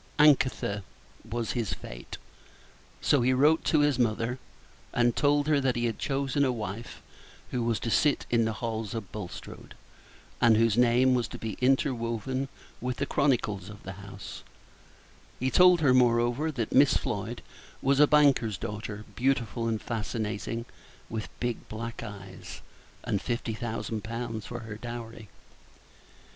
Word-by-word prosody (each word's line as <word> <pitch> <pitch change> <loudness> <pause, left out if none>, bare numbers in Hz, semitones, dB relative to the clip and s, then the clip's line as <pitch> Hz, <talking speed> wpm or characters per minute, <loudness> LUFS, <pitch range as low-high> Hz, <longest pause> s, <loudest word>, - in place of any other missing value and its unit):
Anakthe! 145 -3 +5
It 100 0 -2 0.5
was 115 0 -2
his 115 -5 -2
fate. - - -9 0.8
So 145 - +3
he 130 +2 +3
wrote 150 +5 +4
to 155 - +4
his 145 -3 +2
mother, 115 +1 0 0.5
and 120 -1 +3
told 145 0 +3
her 150 -2 +4
that 130 -2 +1
he 120 0 0
had 115 -2 -2
chosen 140 0 0
a 130 - +3
wife 110 -1 -6 0.5
who 125 - -1
was 115 -1 +1
to 115 - -2
sit 150 +4 +3
in 115 -1 +4
the 110 - -1
halls 110 0 -3
of 105 -5 -5
Bulstrode, 100 -5 -8 0.7
and 115 -2 +6
whose 115 -2 +3
name 125 +2 +4
was 120 -2 +1
to - - -8
be 110 -2 -4
interwoven 130 0 0 0.3
with 125 0 -2
the 140 - 0
chronicles 105 -10 0
of 105 -1 -11
the 95 - -6
house; 100 +1 -9 1.1
told 180 +1 +6
her, 135 -4 +5
moreover, 120 +4 +3
that 120 -7 -3
Miss 135 0 +6
Floyd 110 +2 -4 0.4
was 135 +1 +2
a 150 - +8
banker's 135 -9 +4
daughter, 105 +2 -5
beautiful 120 -2 0
and 110 -1 0
fascinating, 115 0 -3 0.5
with 110 -1 -4
big 120 -2 -3
black 115 +1 -5
eyes, 95 -2 -9 0.4
and 100 - -1
fifty 120 -2 -2
thousand 110 -2 -4
pounds 115 0 -4
for 120 -1 -6
her 110 -2 -7
dowry. 115 -2 -7
120 Hz, 150 wpm, -28 LUFS, 110-130 Hz, 1.1 s, a